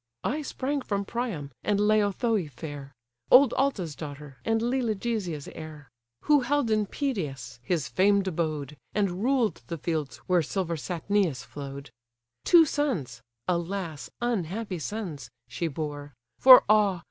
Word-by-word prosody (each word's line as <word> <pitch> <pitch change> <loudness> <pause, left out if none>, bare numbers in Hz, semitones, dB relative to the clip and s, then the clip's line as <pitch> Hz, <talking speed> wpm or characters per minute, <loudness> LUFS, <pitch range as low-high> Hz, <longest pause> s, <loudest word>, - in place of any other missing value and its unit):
I 300 +4 -1
sprang 280 0 -2
from 200 -4 -2
Priam, 200 - -4
and 205 -1 +1
Laothoe 210 -2 +2
fair, 145 -2 -8 0.4
(Old 255 -1 +7
Altes' 200 - 0
daughter, 145 -2 -8
and 225 0 +1
Lelegia's 220 - -1
heir; 155 -3 -10 0.3
Who 295 -1 +4
held 260 -2 0
in 215 -1 +2
Pedasus 140 - -4
his 155 +3 -1
famed 200 +1 +3
abode, 155 -4 -2 0.2
And 200 -2 0
ruled 255 -4 +1
the 170 - -4
fields 150 -5 -3
where 180 -2 +3
silver 170 +1 -2
Satnio 180 +1 0
flow'd,) 140 0 -8 0.5
Two 335 -2 +7
sons 225 - -2 0.3
(alas! 170 -5 -2
unhappy 205 -4 -2
sons) 160 - -5 0.2
she 120 +8 -3
bore; 145 -2 -5 0.2
For 255 -1 +10
ah! 205 -4 +4
185 Hz, 130 wpm, -27 LUFS, 150-225 Hz, 0.5 s, For